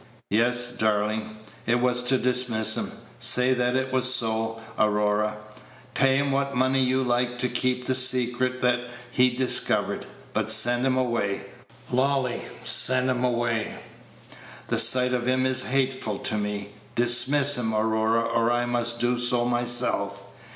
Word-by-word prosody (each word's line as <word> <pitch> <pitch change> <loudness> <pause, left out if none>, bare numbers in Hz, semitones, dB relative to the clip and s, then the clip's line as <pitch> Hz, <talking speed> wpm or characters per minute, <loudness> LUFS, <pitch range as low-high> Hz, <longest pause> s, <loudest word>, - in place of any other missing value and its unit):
"Yes, 120 +3 +1
darling, 110 0 -2 0.3
it 120 +1 +1
was 125 0 +1
to 130 +1 +2
dismiss 125 -3 0
him - - -4 0.3
say 125 +1 +4
that 125 0 -1
it 130 0 -2
was 130 0 +5
so, 115 -2 0 0.2
Aurora. 105 0 0 0.6
Pay 135 0 +2
him 140 0 -1
what 140 0 -2
money 130 +1 +1
you 130 +1 0
like 125 0 -1
to 125 - -2
keep 125 0 -1
the 130 - 0
secret 130 0 +2
that 125 -1 +1 0.3
he 125 0 +3
discovered, 125 +1 -1 0.3
but 110 0 -2
send 120 +3 +4
him 130 0 0
away, 115 -6 -2 0.5
Lolly, 130 -1 -1 0.2
send 130 0 +4
him 125 0 -3
away. 120 -3 -2 0.9
The - - +2
sight 125 0 +4
of 125 -1 -2
him 130 0 +1
is 130 0 +2
hateful 130 -5 -2
to 110 - -3
me. 105 -1 -4 0.3
Dismiss 125 +4 +3
him, 115 -2 -2
Aurora, 110 +1 0
or 115 0 -1
I 120 0 -1
must 120 -1 0
do 120 0 0
so 120 0 +1
myself." 120 -5 -1
125 Hz, 150 wpm, -24 LUFS, 115-130 Hz, 0.9 s, was